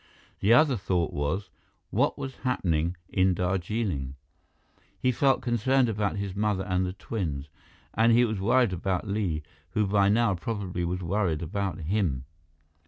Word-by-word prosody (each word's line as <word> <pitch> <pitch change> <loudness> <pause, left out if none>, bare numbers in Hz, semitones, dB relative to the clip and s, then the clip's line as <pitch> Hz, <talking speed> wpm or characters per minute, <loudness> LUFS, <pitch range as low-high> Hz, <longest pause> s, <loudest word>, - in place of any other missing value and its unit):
The 105 - +2
other 135 +1 +5
thought 90 -4 -1
was 75 +8 -2 0.4
what - - +1
was 135 -1 -6
happening 85 -9 0
in 95 -1 +2
Darjeeling? 90 - -1 0.8
He 125 - +2
felt 135 +2 +2
concerned 125 +2 +2
about 105 -2 -1
his 100 -2 -4
mother 105 -2 0
and 90 -1 0
the 90 - -4
twins. 80 -9 -4 0.4
And 115 +2 +4
he 120 +1 +5
was 110 -3 -2
worried 120 0 +3
about 90 +2 -2
Li, 95 -7 -1 0.3
who 105 - +2
by 100 0 +3
now 110 0 +3
probably 95 -2 -3
was 90 +2 -2
worried 85 -3 0
about 95 +1 -3
him. 80 -7 -1
100 Hz, 150 wpm, -27 LUFS, 90-110 Hz, 0.8 s, other